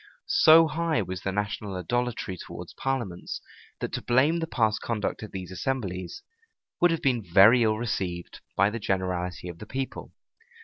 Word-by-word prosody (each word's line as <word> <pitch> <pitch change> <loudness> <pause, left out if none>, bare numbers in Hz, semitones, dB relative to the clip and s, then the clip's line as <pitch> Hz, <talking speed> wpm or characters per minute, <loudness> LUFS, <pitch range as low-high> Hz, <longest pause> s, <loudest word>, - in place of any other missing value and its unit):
So 165 - +7
high 160 -6 0
was 90 0 -5
the 95 - -2
national 105 0 -3
idolatry 120 +1 -2
towards - - -9
parliaments, 120 -10 -3 0.4
that - - -3
to - - -2
blame 140 +7 +3
the 165 - -2
past 110 -7 +1
conduct 110 -3 -2
of 110 - -8
these 95 -1 -6
assemblies 95 -4 -3 0.6
would 175 - +5
have 165 -1 -1
been 125 -4 +2
very 100 +7 +6
ill 110 -1 +3
received 95 -7 -3 0.2
by 100 +2 +4
the 115 - -4
generality 90 -2 -2
of 85 -1 -8
the 110 - -9
people. 135 +2 -5
110 Hz, 165 wpm, -27 LUFS, 95-130 Hz, 0.6 s, So